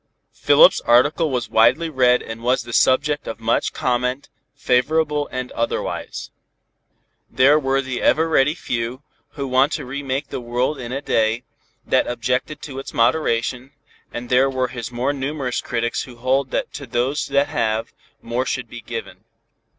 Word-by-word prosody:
Philip's - - +5
article 145 +7 +3
was 125 -4 -2
widely 120 +9 +4
read 125 -5 +3
and 110 +1 -8
was 125 +1 +1
the 120 0 -9
subject 145 +5 +2
of 115 - -5
much 115 +1 0
comment, 125 +2 -1 0.3
favorable 150 +3 +1
and 130 -1 -4
otherwise. 115 - -3 1.0
There 135 +5 +4
were 135 -1 0
the 130 -1 -4
ever 160 +1 +3
ready 150 -1 +3
few, 120 -1 -4 0.3
who 140 -2 -4
want 130 +3 +3
to - - -3
re 140 +3 -5
make 135 +1 -3
the - - -5
world 125 +4 -1
in 120 -1 -6
a 135 +2 -4
day, 115 0 +1 0.4
that - - +2
objected 125 +5 -2
to 135 -2 -6
its 135 - -8
moderation, 125 0 +1 0.4
and 120 +1 -6
there 130 +2 +4
were 130 -1 -1
his 120 -2 -6
more 125 +4 -1
numerous 135 -2 -3
critics 120 0 -2
who 125 - -9
hold 130 +3 0
that - - -3
to 140 -2 -7
those 125 +5 -1
that 140 +1 +1
have, 110 0 -1 0.3
more 120 +3 -2
should 125 -3 -2
be 120 0 -9
given. 110 -4 -7
130 Hz, 165 wpm, -21 LUFS, 120-140 Hz, 1.0 s, Philip's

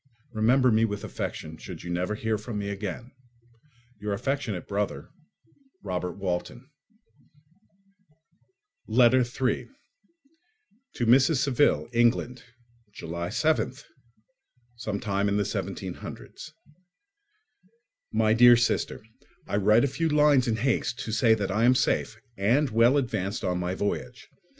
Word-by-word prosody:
Remember 125 +4 +3
me 110 +1 +3
with 105 -2 -2
affection, 80 0 -6
should - - -9
you 85 - -6
never 90 +4 -1
hear 110 -1 -2
from 110 0 -6
me 100 -1 -3
again. 100 +5 -6 0.9
Your 105 0 -3
affectionate 120 -4 -3
brother, 100 0 -3 0.7
Robert 90 -2 -3
Walton 100 +6 -4 2.2
Letter 125 +2 +4
3 125 +1 -2 1.3
To 120 - -1
Mrs. 130 +7 +5
Saville, 140 0 +2
England. 120 +1 +1 0.5
July 85 -2 -5
7th, 155 - 0 1.0
17—. 100 -1 -3 1.8
My 110 0 +2
dear 120 +1 +7
Sister, 115 -2 -1 0.4
I - - -3
write 105 +3 +4
a - - +3
few 160 +4 -1
lines 150 -4 +4
in 115 - +1
haste 120 0 -1
to 110 - -5
say 115 0 +4
that 100 -3 -3
I 110 +3 +1
am 125 +2 +5
safe—and 120 +1 0
well 115 +5 +4
advanced 110 -7 -2
on 90 -2 -1
my 90 +1 -2
voyage. 100 +1 -4
110 Hz, 110 wpm, -26 LUFS, 100-125 Hz, 2.2 s, dear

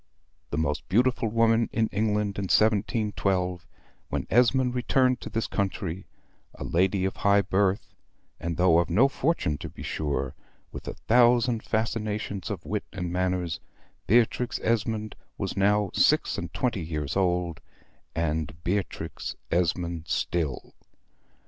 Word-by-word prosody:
The 70 - -3
most 75 -1 -1
beautiful 120 +2 +2
woman 115 +1 +3
in 115 - +2
England 105 -1 0
in 100 - -2
1712, 100 -4 +1 0.4
when - - -2
Esmond 125 +2 +4
returned 125 0 +2
to - - -6
this 115 +1 -1
country, 95 -2 -3 0.5
a - - -7
lady 95 +2 +1
of 95 - -2
high 100 0 +4
birth, 95 +1 0 0.5
and 85 -1 -3
though 90 -2 +5
of 85 - 0
no 110 +11 +5
fortune 135 - 0
to - - -6
be - - -10
sure, 70 -3 -2 0.4
with - - -9
a - - -4
thousand 120 0 +3
fascinations 110 -3 -2
of 100 -6 -5
wit 105 0 -2
and 90 -3 -4
manners, 90 -2 -1 0.5
Beatrix 120 +2 +2
Esmond 110 -1 0 0.2
was - - -3
now 100 0 +2
six - - +3
and - - -5
twenty 120 -7 -1
years 75 -3 -3
old, 90 -3 0 0.5
and 80 -2 -1
Beatrix 100 +3 -3 0.2
Esmond 85 -1 0
still. 80 -6 -2
100 Hz, 135 wpm, -27 LUFS, 85-115 Hz, 0.5 s, though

